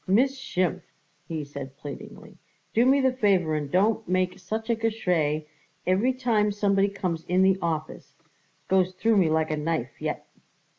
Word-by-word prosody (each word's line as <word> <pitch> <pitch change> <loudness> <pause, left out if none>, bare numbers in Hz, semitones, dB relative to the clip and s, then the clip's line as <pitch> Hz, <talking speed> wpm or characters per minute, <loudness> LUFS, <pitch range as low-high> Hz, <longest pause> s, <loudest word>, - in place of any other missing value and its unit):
"Miss 255 +8 +3
Schimpf," 185 -7 -1 0.5
he 160 -2 -3
said 140 -1 -8
pleadingly, 145 -1 -9 0.4
"do 235 +3 +4
me 275 +1 +5
the 260 -1 +2
favour 195 -9 +2
and 150 -2 -2
don't 215 +3 +2
make 185 0 0
such 220 +4 -4
a - - +2
Geschrei 180 -9 0 0.4
every 195 +8 +3
time 230 -5 +1
somebody 200 -1 +2
comes 180 -5 -3
in 185 +1 +3
the 190 0 +3
office. 155 -2 -4 0.5
Goes 185 -1 +2
through 220 +3 +2
me 180 -5 +4
like 160 0 +1
a 155 - -1
knife 150 -4 -3
yet." - - -3
185 Hz, 160 wpm, -26 LUFS, 160-215 Hz, 0.5 s, me